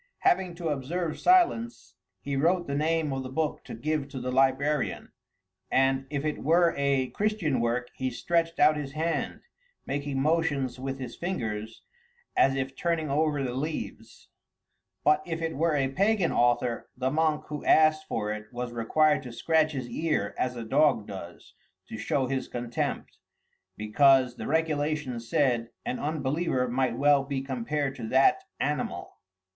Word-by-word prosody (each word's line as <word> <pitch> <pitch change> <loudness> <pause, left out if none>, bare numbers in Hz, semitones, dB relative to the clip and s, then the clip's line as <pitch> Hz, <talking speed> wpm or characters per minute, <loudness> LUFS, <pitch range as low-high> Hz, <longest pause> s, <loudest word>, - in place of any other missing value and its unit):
Having 180 -1 +2
to 170 -2 -3
observe 155 +4 -2
silence, 345 -11 +2 0.3
he 140 0 -3
wrote 170 +5 +2
the 140 - -4
name 155 0 0
of 135 - -2
the 130 - -6
book 155 +3 -2
to - - -7
give 150 +4 -2
to 135 - -6
the 125 0 -3
librarian, 135 +2 +1 0.6
and 135 0 +2
if 145 0 -3
it 150 - -1
were 170 +3 +4
a 140 -2 +1
Christian 200 - 0
work, 120 +1 0
he 130 0 -2
stretched 165 +6 -1
out 150 +1 +5
his 140 -2 -5
hand, 160 +2 -2 0.4
making 140 -1 -2
motions 140 -4 0
with 135 +1 -4
his 125 -3 -7
fingers 110 - -4 0.5
as 135 0 +4
if 135 0 -3
turning 165 -3 -1
over 150 -1 +1
the 125 -2 -2
leaves; 150 +5 -5 0.7
but 150 0 +4
if 165 -1 -3
it 165 -1 -3
were 165 +3 +1
by 145 - +2
a 135 - 0
pagan 195 +5 +2
author, 120 0 +1
the 130 +1 0
monk 155 0 +1
who 150 -1 -5
asked 155 0 +4
for 105 -1 -2
it 110 0 -9
was 125 0 -4
required 150 +6 +2
to 125 - -8
scratch 155 +5 +1
his 130 -3 -4
ear 120 -5 -1
as 125 0 -1
a 120 - -5
dog 135 -3 +3
does, 95 -4 -10 0.3
to - - -7
show 130 +5 0
his 130 0 -2
contempt, 120 -1 -4 0.6
because, 125 +3 +4
the - - -5
regulations 150 -6 -1
said, 125 -7 +1 0.2
an 125 - -2
unbeliever 145 -2 -1
might 125 -1 0
well 145 -1 +4
be 135 -1 -3
compared 135 +2 -2
to 110 - -6
that 135 - +4 0.2
animal. 145 -3 -3
140 Hz, 160 wpm, -28 LUFS, 125-155 Hz, 0.7 s, out